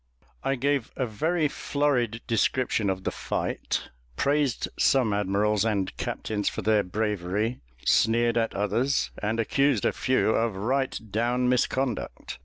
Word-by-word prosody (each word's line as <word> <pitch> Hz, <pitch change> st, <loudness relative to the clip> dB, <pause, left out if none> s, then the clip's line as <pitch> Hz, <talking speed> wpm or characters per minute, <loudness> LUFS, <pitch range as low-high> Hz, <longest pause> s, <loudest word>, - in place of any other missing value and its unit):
I 135 Hz, -, +1 dB
gave 140 Hz, -1 st, 0 dB
a 130 Hz, -, 0 dB
very 155 Hz, +9 st, 0 dB
florid 130 Hz, -6 st, 0 dB
description 115 Hz, -2 st, +1 dB
of 95 Hz, 0 st, -2 dB
the -, -, -1 dB
fight; -, -, -3 dB, 0.3 s
praised 140 Hz, -, +1 dB
some 125 Hz, -6 st, +3 dB
admirals 105 Hz, +1 st, +1 dB
and 105 Hz, -4 st, -1 dB
captains 105 Hz, -2 st, -2 dB
for -, -, -5 dB
their 110 Hz, -1 st, +4 dB
bravery, 105 Hz, +3 st, -2 dB, 0.3 s
sneered 115 Hz, +1 st, +3 dB
at 115 Hz, -1 st, 0 dB
others, 110 Hz, +7 st, 0 dB
and 110 Hz, +2 st, -1 dB
accused 135 Hz, +1 st, +2 dB
a -, -, +3 dB
few 130 Hz, -4 st, +2 dB
of 115 Hz, -2 st, +1 dB
right 130 Hz, +7 st, -1 dB
down 120 Hz, +3 st, +1 dB
misconduct. 125 Hz, -, -1 dB
115 Hz, 135 wpm, -26 LUFS, 105-130 Hz, 0.3 s, their